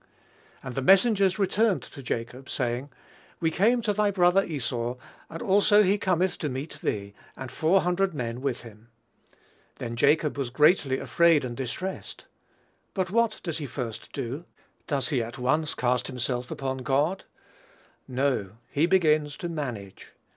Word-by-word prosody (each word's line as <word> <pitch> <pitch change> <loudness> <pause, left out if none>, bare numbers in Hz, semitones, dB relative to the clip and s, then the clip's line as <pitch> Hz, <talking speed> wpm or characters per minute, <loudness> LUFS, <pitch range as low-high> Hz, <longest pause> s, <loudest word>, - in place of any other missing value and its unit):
"And 130 - -6
the 135 - -2
messengers 195 - +4
returned 200 - +2
to 140 - -10
Jacob, 125 +2 -5
saying, 125 +2 -2 0.5
We 165 -1 +1
came 230 +8 +3
to 210 -2 +1
thy 210 0 +2
brother 185 0 +4
Esau, 125 -6 -3 0.3
and 165 - -6
also 205 +2 +5
he 200 +2 +2
cometh 185 -1 +1
to 150 - -2
meet 135 +4 -5
thee, 100 -1 -2 0.2
and 130 -2 -7
four 170 +8 +3
hundred 180 0 0
men 120 -2 -3
with 130 -3 -2
him. 110 0 -14 0.9
Then 115 0 -5
Jacob 150 +4 +2
was 135 -3 -1
greatly 145 0 +3
afraid 165 -3 +3
and 120 -1 -5
distressed." 135 +10 -5 0.7
But 185 -2 -1
what 230 +1 +1
does 165 -3 -3
he 145 - -4
first 120 -3 -6
do? 135 +5 -5 0.4
Does 140 -4 0
he 135 -6 +1
at 115 +3 -6
once 150 +5 0
cast 125 -1 0
himself 125 -1 -2
upon 135 -1 -3
God? 145 +9 0 0.8
No; 130 -7 -1 0.2
he 155 +4 +2
begins 155 -5 +3
to 175 - -4
manage. 120 - -6
145 Hz, 155 wpm, -27 LUFS, 125-185 Hz, 0.9 s, also